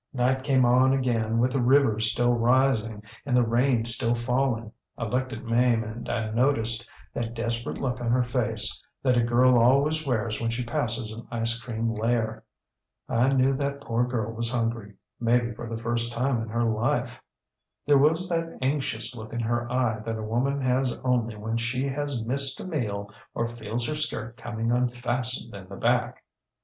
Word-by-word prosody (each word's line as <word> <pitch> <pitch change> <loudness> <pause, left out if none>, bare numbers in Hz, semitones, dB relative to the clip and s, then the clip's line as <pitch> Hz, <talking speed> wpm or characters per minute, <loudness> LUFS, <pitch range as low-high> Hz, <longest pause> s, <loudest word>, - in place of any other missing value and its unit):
ŌĆ£Night 130 +1 +1
came 135 -3 +3
on 130 +2 +4
again 115 -4 0
with 125 +2 +2
the 135 -1 0
river 125 -3 +4
still 120 +2 +2
rising 115 -3 +2 0.2
and 125 -4 +1
the 120 - +4
rain 120 0 +2
still 115 0 +2
falling. 120 -2 -1 0.3
I - - -4
looked 125 +4 -1
at 115 - -7
Mame 115 0 +2
and 110 +2 -7
I 110 -2 -2
noticed 115 -1 +1 0.2
that 115 0 -4
desperate 115 0 -2
look 125 -2 -3
on 120 - -1
her 125 +1 +3
face 115 -3 -1 0.2
that 130 -2 +3
a 120 - +4
girl 120 +1 +4
always 140 +6 +3
wears 120 -5 -1
when 115 - 0
she 115 +2 -2
passes 115 -2 -1
an 115 +1 -10
ice 115 0 +1
cream 115 -1 -2
lair. 110 0 -1 0.6
I 125 +4 +2
knew 135 0 +3
that 140 0 -2
poor 115 -3 0
girl 115 -3 -2
was 115 +1 -1
hungryŌĆömaybe 115 +1 -1
for 120 0 -7
the 115 - -4
first 115 0 -1
time 120 0 0
in 115 - -6
her 115 +2 0
life. 115 +1 -1 0.6
There 145 -1 +5
was 160 +6 +3
that 165 -1 -2
anxious 130 -3 -1
look 110 -1 -9
in 120 - -2
her 120 +1 -1
eye 120 -3 +1
that 110 +1 -4
a 110 - -5
woman 130 +6 0
has 130 0 +1
only 120 -3 0
when 110 +2 -3
she 120 +3 -1
has 140 -4 -2
missed 135 +2 +1
a - - -6
meal 105 - -3 0.2
or 115 - 0
feels 115 0 -2
her 155 - -1
skirt 120 -7 -2
coming 115 -1 -3
unfastened 120 0 0
in 95 -2 -10
the 100 - -8
back. 120 +3 0
120 Hz, 180 wpm, -26 LUFS, 115-130 Hz, 0.6 s, There